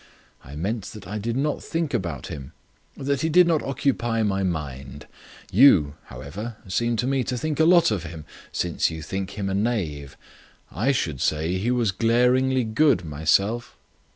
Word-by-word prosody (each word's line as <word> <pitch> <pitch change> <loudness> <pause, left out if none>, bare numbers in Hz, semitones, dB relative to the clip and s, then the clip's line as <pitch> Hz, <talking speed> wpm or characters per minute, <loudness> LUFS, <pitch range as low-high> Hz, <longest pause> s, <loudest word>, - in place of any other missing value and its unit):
I 70 +3 -11
meant 100 +7 -3
that 105 -4 -10
I 105 +3 -4
did 115 +3 -2
not 150 +2 -1
think 165 -3 -2
about 90 - -3
him; 70 -2 -8 0.4
that 140 0 -1
he 160 - +1
did 180 +3 +6
not 165 -3 +2
occupy 120 -4 0
my 100 -2 0
mind. 70 -6 -4 0.5
You, 95 - +6
however, 85 - -7
seem 115 +5 0
to 120 - -1
me 135 0 +1
to 125 - -2
think 155 +3 -3
a 160 - +5
lot 170 -6 +5
of 100 -5 -1
him, 80 -2 -8 0.3
since 90 -1 0
you 80 -1 -7
think 95 +5 -5
him 100 -1 -2
a 95 - -1
knave. 95 - -2 0.5
I 115 - +1
should 80 - -2
say 80 +4 0
he 110 +5 -1
was 120 -4 +2
glaringly 125 +5 +2
good 110 - +2
myself." 90 +10 0
105 Hz, 175 wpm, -24 LUFS, 80-125 Hz, 0.5 s, did